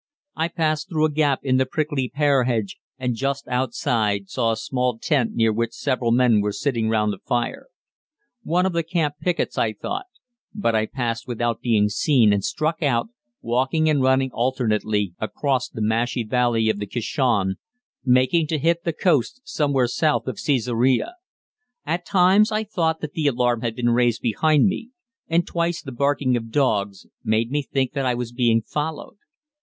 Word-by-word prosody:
I 160 - 0
passed 160 0 -1
through 155 -3 +1
a 155 - 0
gap 145 -2 +1
in 130 -1 +2
the 130 - +2
prickly 145 -3 -2
pear 140 -3 +2
hedge, 110 -6 -1 0.2
and 125 -1 -1
just 135 +3 -2
outside 115 -5 -1
saw 115 - +1
a - - 0
small 125 +1 -1
tent 130 -2 0
near 115 -1 +2
which 115 +1 -1
several 125 -4 -1
men 120 -3 +4
were 105 0 -1
sitting 115 -5 -1
round 105 -1 +1
a 95 - -9
fire. 120 -1 -2 0.7
One 180 -2 +1
of 190 - 0
the 170 - +1
camp 160 -3 -1
pickets 180 -2 -1
I 110 -1 +1
thought; 375 - -5 0.5
but 205 - 0
I 110 0 +1
passed 115 -2 -3
without 120 -1 -2
being 110 -4 +2
seen 110 0 +3
and 100 -1 0
struck 155 - -1
out, 135 - +1 0.3
walking 130 +7 +1
and 145 -3 +2
running 130 0 +2
alternately, 110 -6 0
across 130 +4 -1
the 110 - -4
marshy 115 +2 0
valley 115 -1 +1
of 110 -2 0
the 105 - -4
Kishon, 115 -4 0 0.5
making 130 +6 +3
to 155 - -1
hit 170 +3 +1
the 170 - -1
coast 165 - +1
somewhat 140 - 0
south 155 -2 +1
of 130 -4 -4
Cæsarea. 125 - +1 0.7
At 170 +3 -2
times 195 +3 +4
I 215 0 0
thought 165 -7 -1
that 150 -1 -5
the 155 -3 0
alarm 120 -3 +1
had 115 -2 -2
been 120 0 +1
raised 120 -1 +1
behind 150 +6 +3
me, 205 +4 -1 0.4
and 170 +1 +1
twice 170 0 -1
the 135 - -8
barking 140 0 +1
of 115 -1 -4
dogs 105 -7 0 0.2
made 110 +2 0
me 145 +1 +1
think 135 -2 -2
that 135 -2 -1
I 125 - +1
was 120 -1 -4
being 120 -2 +2
followed. 150 - -4
130 Hz, 180 wpm, -22 LUFS, 115-155 Hz, 0.7 s, men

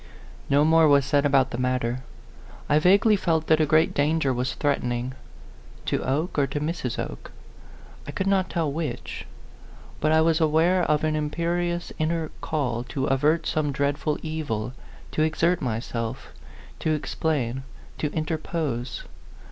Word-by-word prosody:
No 145 +2 +4
more 160 0 +5
was 140 -2 +5
said 145 +1 +3
about 135 -1 +3
the 120 - -4
matter. 125 -1 0 0.7
I 150 - +4
vaguely 200 +6 +5
felt 165 -5 0
that 160 0 +4
a 155 - +2
great 155 +2 +3
danger 145 -1 +2
was 125 +1 -2
threat 145 -1 +1
ening. 120 +1 -2 0.7
To - - 0
Oke 150 +5 -1
or 140 - +3
to 140 +2 -3
Mrs, 150 -5 -3
Oke? - - -5 0.8
I - - -4
could 190 - -2
not 195 -1 +2
tell 160 -4 -1
which; 155 +1 -4 0.7
but 155 - +2
I 160 - +5
was 165 0 +3
aware 165 +4 +3
of 150 0 +1
an 155 0 +1
im 150 -1 -1
perious 175 +2 -1
inner 160 0 -1
call 130 -7 -1
to 135 0 -2
avert 150 +5 +2
some 150 -2 0
dreadful 140 +2 0
evil, 130 -8 -3 0.4
to - - -1
exert 165 +3 +2
myself, 115 -2 -3 0.5
to 155 - +1
explain, 145 -4 -1 0.4
to 150 - 0
interpose. 155 -6 -3
150 Hz, 155 wpm, -25 LUFS, 135-160 Hz, 0.8 s, more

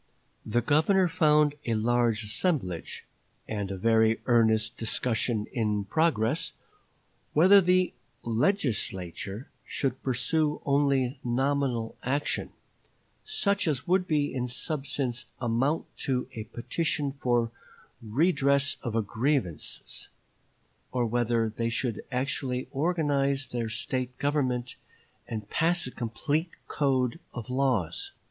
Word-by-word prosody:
The 115 +2 0
Governor 170 - +4
found 150 -3 +4
a 115 - 0
large 115 0 +2
assemblage, 105 - -1 0.4
and 100 -3 -3
a 95 - -4
very 110 +2 +3
earnest 110 -2 +3
discussion 115 -1 0
in 105 -4 0
progress, 135 -5 +1 0.8
whether 190 +6 +7
the 180 0 +3 0.3
"Legislature" 110 - -1
should 130 -2 -2
pursue 150 +4 +1
only 140 -2 +2
nominal 130 -2 0
action, 140 +3 -1 0.7
such 200 - +1
as 135 -5 0
would 180 +1 +2
in 145 -4 +1
substance 130 -2 -3
amount 130 +6 0
to 130 -2 -1
a 110 -2 -6
petition 140 +5 -1
for 120 -4 0 0.5
redress 140 +2 +2
of 120 - -4
grievances, 115 - -2 0.8
or 125 -1 +1
whether 115 0 +1
they 115 0 0
should 115 -1 -2
actually 130 -1 -2
organize 145 -3 +1
their 120 -2 -3
State 125 +2 -2
government, 130 -4 -1 0.5
and 110 -3 -5
pass 170 +1 +2
a 125 - -5
complete 145 +9 -2 0.2
code 130 -1 +1 0.2
of 120 0 -6
laws. 125 -11 0
125 Hz, 105 wpm, -28 LUFS, 115-145 Hz, 0.8 s, whether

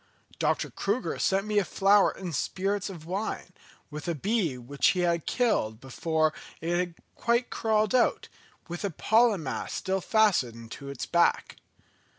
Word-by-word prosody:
Dr. - - 0
Crüger 210 +6 -2
sent 195 +1 +2
me 210 -1 +2
a - - +1
flower 195 +2 +4
in 180 -3 -7
spirits 195 +7 -1
of 170 -5 -9
wine, 185 0 -4 0.4
with 150 +2 -7
a 170 - 0
bee 190 - 0
which 130 +3 0
he 180 - +2
had 170 -2 0
killed 110 - +1
before 155 +4 0 0.3
it 170 +1 -1
had 175 -1 -1 0.2
quite 235 +1 0
crawled 215 -1 +1
out, 255 - +2 0.4
with 175 +3 -6
a 200 - 0
pollen 220 +1 +3
mass 135 - -4
still 190 0 -1
fastened 130 - +1
to 140 -1 -8
its 140 -3 -5
back. 170 0 +1
180 Hz, 160 wpm, -28 LUFS, 155-210 Hz, 0.4 s, flower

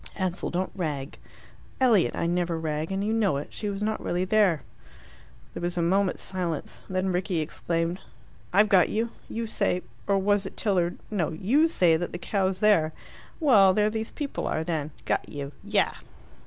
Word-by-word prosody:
"Ansell, 185 -1 -1
don't 185 +2 -2
rag." 150 -6 -4 0.6
"Elliot, 235 -8 +4
I - - -1
never 175 -1 0
rag, 155 +1 -2
and 195 +1 -1
you 215 +2 0
know 210 -9 +2
it. 145 - -5
She 210 - -4
was 200 +1 -3
not 215 0 -1
really 180 +1 0
there." 185 -8 +3 0.9
There - - -6
was 175 +1 -2
a 170 - +2
moment's 190 +2 +1
silence. 175 -5 -4
Then 185 0 0
Rickie 180 -1 0
exclaimed, 165 +2 -2 0.5
"I've 205 +3 +5
got 190 -4 +5
you. 225 +2 -1 0.2
You 230 +1 -3
say 180 -4 0 0.2
or 200 -1 +3
was 200 0 +2
it - - -11
Tilliard? 180 -4 +1
no, 170 -6 0
YOU 245 - +3
say 175 - +3
that 175 +1 -4
the - - -3
cow's 190 0 -1
there. 165 -8 +4 0.5
Well 205 - +6
there 210 0 +3
these 220 0 -3
people 290 -2 -4
are, 160 - -1
then. 160 -3 -2 0.2
Got - - -1
you. 140 -1 -6
Yah!" 205 0 +2
185 Hz, 180 wpm, -27 LUFS, 170-210 Hz, 0.9 s, Well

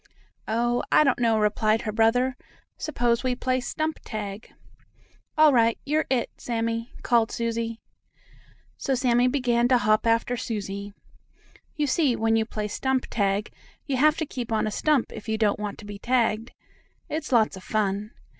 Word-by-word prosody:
"Oh, 240 +2 +1
I - - +6
don't 270 -4 +2
know," 230 -2 +3
replied 215 +1 +1
her 215 - -2
brother. 240 +4 +2 0.4
"S'pose 240 -5 0
we 255 -1 0
play 255 +1 0
stump 310 +6 -3
tag?" 210 -1 -6 0.9
"All 305 -2 +6
right; 230 -2 +3
you're 305 +2 0
'it,' 255 -3 0
Sammie," 230 0 -2
called 235 -2 +2
Susie. 230 -1 -2 1.0
So 270 - 0
Sammie 245 -1 +3
began 245 -3 +2
to 250 0 +4
hop 215 0 +2
after 230 +2 +2
Susie. 205 -4 -4 0.8
You 300 - 0
see, 280 -3 +2
when 225 0 +1
you 220 0 +2
play 210 -2 -3
stump 260 +4 -1
tag 200 -1 0 0.3
you 275 -3 -1
have 305 +3 +4
to 320 - -1
keep 245 -5 -6
on 220 - +1
a 215 - -2
stump 290 +3 +1
if 215 - -8
you 220 - 0
don't 210 -2 +1
want 210 -1 -4
to 210 - -11
be 205 -1 -8
tagged. 230 -1 +1 0.6
It's 310 -1 -4
lots 225 -4 +3
of 190 - -11
fun. 205 -1 -1
230 Hz, 165 wpm, -25 LUFS, 215-255 Hz, 1.0 s, I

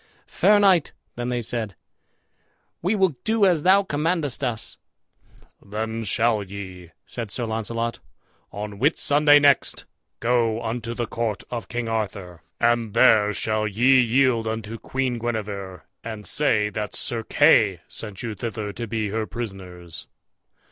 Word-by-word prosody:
"Fair 210 0 +3
knight," 190 -6 +4 0.2
then 120 0 -3
they 120 -1 -2
said, 110 -4 -3 1.1
"we 185 +6 +1
will 190 -5 +2
do 220 -2 +2
as 175 -5 +3
thou 190 +4 +5
commandest 150 -4 -1
us." 115 -4 -4 0.8
"Then 110 +2 -4
shall 110 +2 +2
ye," 95 -3 -8 0.2
said 115 -3 -6
Sir 120 +4 -3
Launcelot, 115 +1 -3 0.5
"on 105 0 -6
Whitsunday 145 +1 +4
next, 145 -2 +2 0.3
go 115 -2 +1
unto 115 +1 -3
the 120 - -2
court 110 -3 -3
of 115 -5 -4
King 120 -1 -3
Arthur, 100 -6 -4 0.2
and 120 -2 +1
there 110 -5 +5
shall 110 +1 -1
ye 125 +6 +4
yield 120 -1 +2
you - - 0
unto 110 0 -6
Queen 130 -3 -2
Guenever, 105 -5 -4 0.2
and 110 -2 -7
say 110 -8 +2
that 105 -2 -4
Sir 115 -1 -1
Kay 110 - +4
sent 105 -4 -7
you 115 -2 -3
thither 105 0 -4
to 115 +3 -6
be 110 -1 -2
her 110 +1 -2
prisoners." 90 -6 -7
115 Hz, 140 wpm, -24 LUFS, 105-125 Hz, 1.1 s, thou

